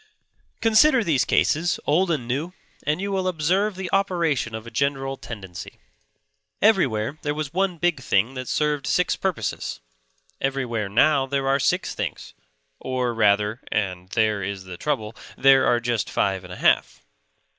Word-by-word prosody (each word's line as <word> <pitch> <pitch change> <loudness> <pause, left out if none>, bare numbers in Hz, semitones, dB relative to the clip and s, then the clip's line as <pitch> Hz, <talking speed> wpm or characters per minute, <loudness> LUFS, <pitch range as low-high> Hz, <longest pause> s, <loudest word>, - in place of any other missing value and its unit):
Consider 230 +3 +5
these 155 -9 +2
cases, 170 +3 +1
old 175 +5 +2
and 145 -8 -1
new, 145 +8 -2 0.3
and 150 +3 +1
you 200 +1 -3
will 190 -1 -1
observe 185 +5 +1
the 190 0 -5
operation 170 - 0
of 110 0 -7
a 115 - -9
general 135 +2 -1
tendency. 95 -9 -9 0.8
Everywhere 150 - +2
there 145 0 -2
was 155 -1 -4
one 185 -1 0
big 175 -3 +1
thing 120 0 +1
that 130 -1 -6
served 150 -2 0
six 180 -1 +2
purposes; 190 -4 -3 0.6
everywhere 125 -6 -1
now 135 +6 +3
there 135 0 -1
are 135 +1 +2
six - - 0
small - - -18
things; - - -12 0.5
or, 125 -2 -2
rather 105 0 +2
(and 90 -3 -2
there 110 -1 +1
is 95 0 -4
the 95 -1 -8
trouble), 110 -2 -3 0.2
there 135 -1 +5
are 120 - +3
just 120 -2 -1
five 95 -1 0
and 90 - -11
a - - -8
half. - - +1
135 Hz, 160 wpm, -23 LUFS, 110-170 Hz, 0.8 s, Consider